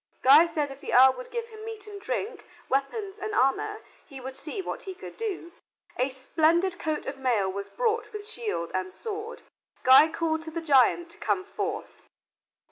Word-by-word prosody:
Guy 290 Hz, +6 st, +8 dB
said 300 Hz, -4 st, -2 dB
if 270 Hz, +1 st, -11 dB
the -, -, -2 dB
earl 260 Hz, +1 st, +8 dB
would 255 Hz, 0 st, -9 dB
give 470 Hz, -1 st, -4 dB
him 435 Hz, -1 st, -11 dB
meat 440 Hz, -2 st, -7 dB
and 410 Hz, -1 st, -9 dB
drink, 475 Hz, -2 st, -3 dB, 0.2 s
weapons 390 Hz, -, -2 dB
and 425 Hz, +1 st, -3 dB
armor, 415 Hz, -, +1 dB, 0.2 s
he 275 Hz, -, -11 dB
would 260 Hz, +1 st, -7 dB
see 310 Hz, +8 st, -6 dB
what 380 Hz, -, -4 dB
he 380 Hz, -1 st, -7 dB
could 370 Hz, -, -10 dB
do. 395 Hz, -6 st, -4 dB, 0.4 s
A 255 Hz, +2 st, +1 dB
splendid 320 Hz, +7 st, +1 dB
coat 310 Hz, -2 st, -2 dB
of 270 Hz, 0 st, -5 dB
mail 225 Hz, -8 st, +1 dB
was 200 Hz, +1 st, -5 dB
brought 455 Hz, -2 st, -1 dB
with 420 Hz, -1 st, -6 dB
shield 430 Hz, -, -3 dB
and 185 Hz, 0 st, -2 dB
sword. 430 Hz, -, -6 dB, 0.4 s
Guy 265 Hz, +4 st, +8 dB
called 320 Hz, -1 st, -1 dB
to 320 Hz, -, -5 dB
the 325 Hz, +1 st, -4 dB
giant 325 Hz, +3 st, +3 dB
to -, -, -12 dB
come 375 Hz, -, 0 dB
forth. -, -, -5 dB
335 Hz, 190 wpm, -27 LUFS, 265-425 Hz, 0.4 s, Guy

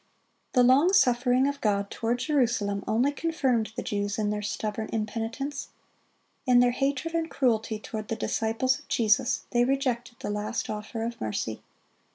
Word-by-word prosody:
The 250 Hz, -, +5 dB
long 280 Hz, +9 st, +5 dB
suffering 250 Hz, -6 st, +4 dB
of 285 Hz, 0 st, -3 dB
God 200 Hz, -2 st, 0 dB
toward 230 Hz, +1 st, -1 dB
Jerusalem 240 Hz, -8 st, 0 dB
only 245 Hz, +6 st, +2 dB
confirmed 265 Hz, -8 st, 0 dB
the -, -, -3 dB
Jews 205 Hz, -1 st, -2 dB
in 210 Hz, -1 st, 0 dB
their 210 Hz, 0 st, -2 dB
stubborn 215 Hz, +1 st, -3 dB
impenitence. 230 Hz, +6 st, -3 dB, 0.8 s
In 250 Hz, -1 st, +6 dB
their 245 Hz, 0 st, +5 dB
hatred 280 Hz, +5 st, -1 dB
and 330 Hz, -1 st, -1 dB
cruelty 225 Hz, -4 st, +1 dB
toward 215 Hz, 0 st, -6 dB
the 225 Hz, -, -2 dB
disciples 225 Hz, +3 st, 0 dB
of -, -, -19 dB
Jesus, 240 Hz, +3 st, +2 dB
they 240 Hz, -1 st, +3 dB
rejected 250 Hz, -2 st, -1 dB
the -, -, -4 dB
last 210 Hz, +2 st, -2 dB
offer 215 Hz, +2 st, -5 dB
of 235 Hz, +1 st, -5 dB
mercy. 110 Hz, 0 st, -3 dB
235 Hz, 160 wpm, -27 LUFS, 215-260 Hz, 0.8 s, In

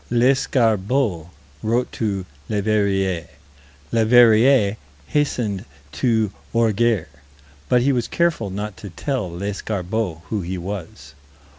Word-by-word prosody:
Lescarbault 120 Hz, -, +2 dB, 0.3 s
wrote 120 Hz, +3 st, 0 dB
to 100 Hz, -4 st, -2 dB, 0.2 s
Leverrier. 100 Hz, -4 st, 0 dB, 0.7 s
Leverrier 115 Hz, -1 st, +5 dB, 0.3 s
hastened 120 Hz, -, -1 dB, 0.3 s
to 110 Hz, -, +1 dB, 0.2 s
Orgères. 115 Hz, -4 st, +2 dB, 0.6 s
But 125 Hz, -1 st, +4 dB
he 140 Hz, -, +3 dB
was 120 Hz, -3 st, 0 dB
careful 170 Hz, -12 st, 0 dB
not 105 Hz, +1 st, -5 dB
to 100 Hz, -, -8 dB
tell 115 Hz, -, -3 dB
Lescarbault 95 Hz, 0 st, -3 dB
who 105 Hz, -, -1 dB
he 90 Hz, +2 st, -4 dB
was. 85 Hz, -6 st, -7 dB
110 Hz, 100 wpm, -21 LUFS, 95-120 Hz, 0.7 s, Leverrier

